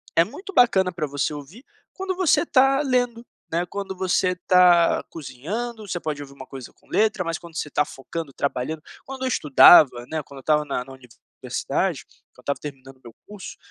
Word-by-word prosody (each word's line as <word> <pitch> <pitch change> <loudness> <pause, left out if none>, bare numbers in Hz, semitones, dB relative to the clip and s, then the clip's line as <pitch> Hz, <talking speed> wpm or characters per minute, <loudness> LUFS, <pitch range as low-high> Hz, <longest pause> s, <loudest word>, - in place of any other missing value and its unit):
é 165 - +6
muito 290 - -9
bacana 190 - +4
pra 170 -3 -3
você 145 +1 -2
ouvir 155 - -10 0.3
quando 380 0 -4
você 365 -3 +3
tá 270 +2 +4
lendo, 245 -4 0 0.3
né, 170 +2 0
quando 195 -1 -5
você 185 0 0
tá 180 -2 +5
cozinhando, 205 - -6
você 175 -2 -3
pode 155 -3 -4
ouvir 140 -1 -9
uma 135 -1 -12
coisa 130 -3 -10
com - - -30
letra, 215 -3 +1
mas 165 -2 -3
quando 170 -2 -14
você 150 - -3
tá 150 +1 +1
focando, 145 +2 -7
trabalhando 140 +3 -3 0.2
quando 265 0 -8
eu - - 0
estudava, 140 - +6
né, 155 -2 -3
quando 140 0 -13
eu - - -11
estava 150 +2 +1
na 135 -3 -3
na 135 +1 -12
universidade, 125 -3 -4 0.3
quando - - -32
eu - - -14
estava 140 - -3
terminando 135 -2 -10
o 130 - -32
meu 115 - -12
curso, 205 -2 -9
165 Hz, 195 wpm, -23 LUFS, 140-210 Hz, 0.3 s, é